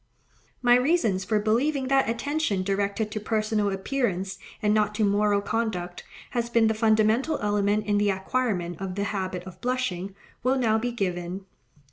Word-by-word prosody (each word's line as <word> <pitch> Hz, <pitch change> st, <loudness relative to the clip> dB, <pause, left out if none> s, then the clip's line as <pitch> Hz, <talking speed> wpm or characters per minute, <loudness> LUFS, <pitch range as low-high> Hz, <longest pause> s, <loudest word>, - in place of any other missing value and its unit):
My 245 Hz, 0 st, +6 dB
reasons 250 Hz, -, +2 dB
for 215 Hz, +2 st, +1 dB
believing 260 Hz, +6 st, +1 dB
that 270 Hz, -3 st, +3 dB
attention 235 Hz, -4 st, -1 dB
directed 200 Hz, +2 st, -1 dB
to 215 Hz, -, -3 dB
personal 215 Hz, -1 st, 0 dB
appearance, 195 Hz, -3 st, -2 dB, 0.2 s
and 210 Hz, 0 st, +2 dB
not 210 Hz, -1 st, +1 dB
to 215 Hz, -1 st, +2 dB
moral 205 Hz, 0 st, +2 dB
conduct, 200 Hz, -5 st, -3 dB, 0.3 s
has 235 Hz, -1 st, -1 dB
been 230 Hz, -1 st, +3 dB
the 220 Hz, -, +3 dB
fundamental 220 Hz, +6 st, +2 dB
element 205 Hz, 0 st, +1 dB
in 205 Hz, 0 st, +2 dB
the 205 Hz, 0 st, +2 dB
acquirement 190 Hz, -3 st, -1 dB
of 190 Hz, -2 st, -4 dB
the 200 Hz, -, -1 dB
habit 190 Hz, -3 st, -3 dB
of 185 Hz, -1 st, -12 dB
blushing, 200 Hz, -7 st, -2 dB, 0.3 s
will 260 Hz, +2 st, +2 dB
now 220 Hz, -3 st, +2 dB
be 245 Hz, +2 st, -2 dB
given. 185 Hz, -3 st, -3 dB
210 Hz, 160 wpm, -26 LUFS, 195-235 Hz, 0.3 s, My